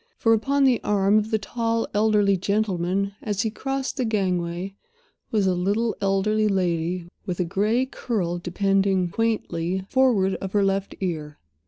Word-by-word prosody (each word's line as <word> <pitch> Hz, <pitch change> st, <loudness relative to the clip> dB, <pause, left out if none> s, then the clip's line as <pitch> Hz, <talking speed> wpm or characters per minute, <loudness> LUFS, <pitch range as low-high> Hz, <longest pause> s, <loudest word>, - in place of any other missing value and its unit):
For, 225 Hz, -, +3 dB
upon 275 Hz, +6 st, +2 dB
the 255 Hz, -3 st, +3 dB
arm 205 Hz, 0 st, +3 dB
of 215 Hz, +1 st, -3 dB
the 220 Hz, -, +2 dB
tall, 230 Hz, +2 st, -1 dB
elderly 205 Hz, -1 st, +3 dB
gentleman, 195 Hz, -1 st, 0 dB
as 205 Hz, 0 st, -1 dB
he 220 Hz, -, -1 dB
crossed 270 Hz, +4 st, -3 dB
the 260 Hz, -, 0 dB
gangway, 185 Hz, -4 st, -1 dB, 0.6 s
was 210 Hz, -3 st, +1 dB
a 185 Hz, -, +3 dB
little 205 Hz, +6 st, 0 dB
elderly 210 Hz, +2 st, +2 dB
lady, 175 Hz, -2 st, -1 dB, 0.2 s
with 180 Hz, -1 st, -3 dB
a 180 Hz, -, +1 dB
gray 215 Hz, +8 st, +1 dB
curl 195 Hz, -10 st, -2 dB
depending 195 Hz, 0 st, +1 dB
quaintly 190 Hz, -5 st, -1 dB
forward 235 Hz, -8 st, +3 dB
of 195 Hz, -1 st, -5 dB
her 205 Hz, -1 st, +3 dB
left 195 Hz, 0 st, -1 dB
ear. 155 Hz, -5 st, -3 dB
200 Hz, 155 wpm, -24 LUFS, 185-220 Hz, 0.6 s, For